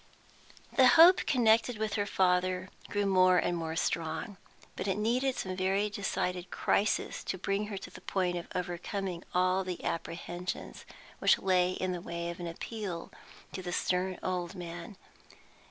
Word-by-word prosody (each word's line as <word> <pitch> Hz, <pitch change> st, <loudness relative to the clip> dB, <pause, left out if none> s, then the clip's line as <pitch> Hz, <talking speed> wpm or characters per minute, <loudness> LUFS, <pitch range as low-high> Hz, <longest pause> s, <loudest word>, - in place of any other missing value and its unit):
The 260 Hz, -2 st, +7 dB
hope 335 Hz, +7 st, +7 dB
connected 230 Hz, -2 st, +3 dB
with 215 Hz, -1 st, -2 dB
her 205 Hz, -1 st, 0 dB
father 185 Hz, 0 st, +1 dB, 0.2 s
grew 205 Hz, 0 st, 0 dB
more 185 Hz, -1 st, +5 dB
and 175 Hz, 0 st, +1 dB
more 165 Hz, -1 st, -3 dB
strong. 165 Hz, +4 st, -2 dB, 0.4 s
But -, -, -4 dB
it 195 Hz, 0 st, 0 dB
needed 250 Hz, +5 st, +1 dB
some 185 Hz, -1 st, -3 dB
very 195 Hz, +3 st, +1 dB
decided 180 Hz, -3 st, -2 dB
crisis 210 Hz, +2 st, 0 dB
to 185 Hz, -, -2 dB
bring 200 Hz, +2 st, -1 dB
her 205 Hz, -2 st, -5 dB
to 190 Hz, -, -8 dB
the 185 Hz, -, -12 dB
point 180 Hz, -2 st, 0 dB
of 175 Hz, -, -5 dB
overcoming 180 Hz, 0 st, -3 dB
all 185 Hz, +1 st, +3 dB
the 180 Hz, -2 st, -5 dB
apprehensions 175 Hz, +2 st, -4 dB, 0.3 s
which -, -, +5 dB
lay 185 Hz, -1 st, +2 dB
in 185 Hz, 0 st, -2 dB
the 175 Hz, -1 st, -4 dB
way 170 Hz, 0 st, -4 dB
of 170 Hz, -, -10 dB
an 175 Hz, -, -4 dB
appeal 180 Hz, 0 st, -5 dB, 0.4 s
to 185 Hz, -, -5 dB
the 180 Hz, -1 st, -5 dB
stern 180 Hz, +1 st, 0 dB
old 180 Hz, 0 st, -2 dB
man. 175 Hz, +2 st, -7 dB
185 Hz, 160 wpm, -31 LUFS, 175-205 Hz, 0.4 s, The